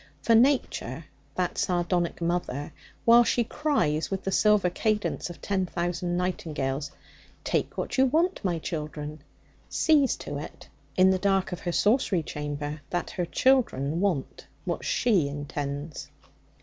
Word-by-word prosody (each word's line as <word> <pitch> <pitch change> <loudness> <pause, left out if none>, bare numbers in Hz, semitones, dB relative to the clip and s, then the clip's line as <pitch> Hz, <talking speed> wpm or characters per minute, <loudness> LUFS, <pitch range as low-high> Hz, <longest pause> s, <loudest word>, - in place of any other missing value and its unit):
For 230 - +4
Nature 225 - +2 0.3
that 180 -1 -1
sardonic 175 -3 0
mother 170 -4 -2 0.3
while 235 +1 +8
she 240 +1 +2
cries 225 - 0
with 195 -1 -3
the 195 - -2
silver 210 -2 +4
cadence 215 -1 -1
of 175 - -11
ten 190 -2 0
thousand 175 0 -2
nightingales, 150 -6 -2 0.5
'Take - - -1
what - - -2
you 265 - +6
want, 330 +5 +1
my 175 -3 0
children,' 150 -2 -5 0.5
sees 295 -4 +3
to 145 0 -6
it, - - -9 0.3
in 185 +1 +6
the 190 - +1
dark 195 -1 +1
of 180 - -4
her 175 - -3
sorcery 205 -3 +2
chamber, 145 0 -5
that 175 0 -2
her 180 - -2
children 170 - +2
want 180 -8 -1 0.2
what - - -2
she 195 -12 +2
intends. 145 +1 -5
175 Hz, 140 wpm, -27 LUFS, 150-210 Hz, 0.5 s, while